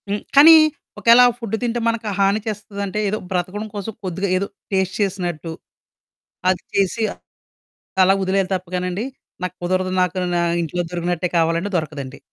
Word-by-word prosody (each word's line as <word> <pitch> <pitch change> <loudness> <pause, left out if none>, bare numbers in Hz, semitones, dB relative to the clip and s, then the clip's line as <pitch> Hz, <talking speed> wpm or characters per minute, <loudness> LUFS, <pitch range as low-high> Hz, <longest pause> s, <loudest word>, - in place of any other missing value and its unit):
హ్మ్, 205 +1 -1
కానీ 305 +4 +10 0.5
ఒకేళ 235 +1 +6
ఆ - - +3
ఫుడ్ 225 -2 -3
తింటే 240 0 -1
మనకు 230 -1 -1
హాని 200 +2 +3
చేస్తాదంటే 200 -1 -4
ఏదో 210 - -1
బ్రతకడం 185 +4 -2
కోసం 205 +2 -5
కొద్దిగా 190 +1 -2
ఏదో 200 +2 -2 0.2
టేస్ట్ 190 -1 0
చేసినట్టు. 175 -5 -2 1.0
అది 185 -1 +1
చేసి, 200 +3 +1 1.0
అలా 190 +1 +5
వదిలేయాలి 190 0 0
తప్పగానండి, 180 +3 -3 0.4
నాకు 185 0 -3
కుదరదు 185 +1 0
నాకు 180 0 0 0.2
నా 175 - +2 0.2
ఇంట్లో 170 +2 -2
దొరికినట్టే 175 0 -1
కావాలంటే 165 +4 +1
దొరకదండి. 140 -4 -5
190 Hz, 140 wpm, -21 LUFS, 175-205 Hz, 1.0 s, కానీ